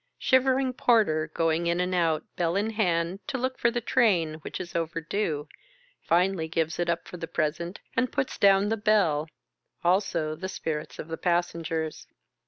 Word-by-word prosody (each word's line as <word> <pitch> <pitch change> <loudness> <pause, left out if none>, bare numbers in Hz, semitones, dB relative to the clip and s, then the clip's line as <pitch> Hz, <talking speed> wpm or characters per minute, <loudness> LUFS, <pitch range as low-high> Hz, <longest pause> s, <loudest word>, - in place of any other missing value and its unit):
Shivering 260 0 +2
porter 200 -12 +2
going 165 +1 +1
in 170 +1 +1
and 180 +1 0
out, 165 -3 +1
bell 170 0 0
in 210 +3 0
hand, 180 -4 0
to 265 - -2
look 260 +1 -2
for 235 - +4
the 240 0 -2
train, 185 -11 +2
which - - -6
is 180 -2 -7
overdue, 165 -1 -2 0.5
finally 175 -1 +1
gives 160 0 -1
it 175 -1 0
up 170 0 -1
for 180 - -8
the 165 - -5
present, 170 +4 -2 0.2
and 255 - +1
puts 265 - -2
down 195 0 +5
the 225 - 0
bell 200 -8 +2 0.3
— - - -44
also 175 -4 +1
the 185 +5 -5
spirits 155 -4 -4
of - - -7
the 165 0 -5
passengers. 165 -2 -1
170 Hz, 175 wpm, -27 LUFS, 160-205 Hz, 0.5 s, down